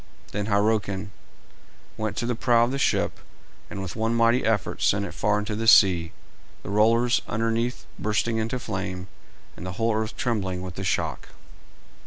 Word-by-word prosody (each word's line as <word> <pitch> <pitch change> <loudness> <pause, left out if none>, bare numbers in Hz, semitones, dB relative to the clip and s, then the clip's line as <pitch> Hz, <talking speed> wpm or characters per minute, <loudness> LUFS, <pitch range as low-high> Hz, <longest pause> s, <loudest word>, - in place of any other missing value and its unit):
Then 105 +1 -3
Hyrroken 100 -2 0 0.8
went 110 -1 -3
to 120 - -1
the 120 - 0
prow 120 0 +3
of 120 - 0
the 135 - -2
ship - - +1 0.5
and 95 - -5
with 90 - -6
one 115 +1 0
mighty 115 +2 +3
effort 110 -4 0
sent 100 0 +2
it - - -7
far 105 0 +1
into 105 0 -3
the 115 +1 -2
sea, 90 -7 +6 0.5
the - - -6
rollers 115 +4 +3
underneath 115 +3 -1
bursting 110 +2 0
into 110 +3 -1
flame, 95 -5 -5 0.5
and - - -10
the 90 0 -5
whole 115 +3 0
earth 110 0 -2
trembling 95 -8 -1
with 90 -1 -6
the 95 - -6
shock. 95 - -2
110 Hz, 170 wpm, -25 LUFS, 100-115 Hz, 0.8 s, sea